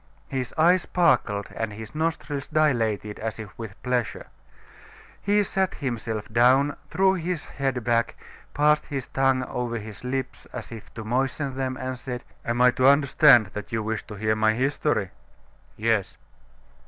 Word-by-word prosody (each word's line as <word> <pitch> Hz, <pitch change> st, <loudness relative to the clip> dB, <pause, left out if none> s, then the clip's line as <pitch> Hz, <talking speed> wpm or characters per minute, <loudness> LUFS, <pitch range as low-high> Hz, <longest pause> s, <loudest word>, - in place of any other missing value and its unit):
His 130 Hz, -2 st, -3 dB
eyes 175 Hz, +3 st, +5 dB
sparkled 120 Hz, -, +1 dB
and 115 Hz, -1 st, -2 dB
his 110 Hz, +3 st, -9 dB
nostrils 155 Hz, -3 st, -2 dB
dilated 115 Hz, -9 st, +1 dB
as 110 Hz, 0 st, -4 dB
if 110 Hz, -2 st, -9 dB
with 110 Hz, -4 st, -8 dB
pleasure. 125 Hz, -7 st, -1 dB, 1.0 s
He 205 Hz, +1 st, +3 dB
sat 190 Hz, -1 st, -1 dB
himself 115 Hz, -5 st, -3 dB
dawn, 130 Hz, +5 st, +4 dB
threw 190 Hz, 0 st, +3 dB
his 175 Hz, -2 st, -3 dB
head 135 Hz, -3 st, -2 dB
back, 115 Hz, 0 st, +1 dB, 0.4 s
passed 150 Hz, +1 st, +3 dB
his 135 Hz, -4 st, -3 dB
tongue 135 Hz, -1 st, +1 dB
over 120 Hz, -2 st, -3 dB
his 110 Hz, -1 st, -9 dB
lips 130 Hz, +1 st, -4 dB
as 125 Hz, -2 st, -7 dB
if 115 Hz, -2 st, -10 dB
to 110 Hz, -, -6 dB
moisten 135 Hz, +4 st, -1 dB
them, 130 Hz, -1 st, -2 dB
and 130 Hz, -1 st, -4 dB
said: 125 Hz, -1 st, -5 dB, 0.2 s
"Am 120 Hz, +1 st, -1 dB
I 125 Hz, -, +7 dB
to 130 Hz, +1 st, +3 dB
understand 140 Hz, -6 st, +6 dB
that 105 Hz, -, -6 dB
you 110 Hz, -1 st, -1 dB
wish 110 Hz, 0 st, -2 dB
to 105 Hz, -, -8 dB
hear 110 Hz, +1 st, 0 dB
my 110 Hz, 0 st, +2 dB
history?" 130 Hz, -6 st, 0 dB, 0.7 s
"Yes." 110 Hz, -3 st, 0 dB
125 Hz, 155 wpm, -25 LUFS, 110-140 Hz, 1.0 s, I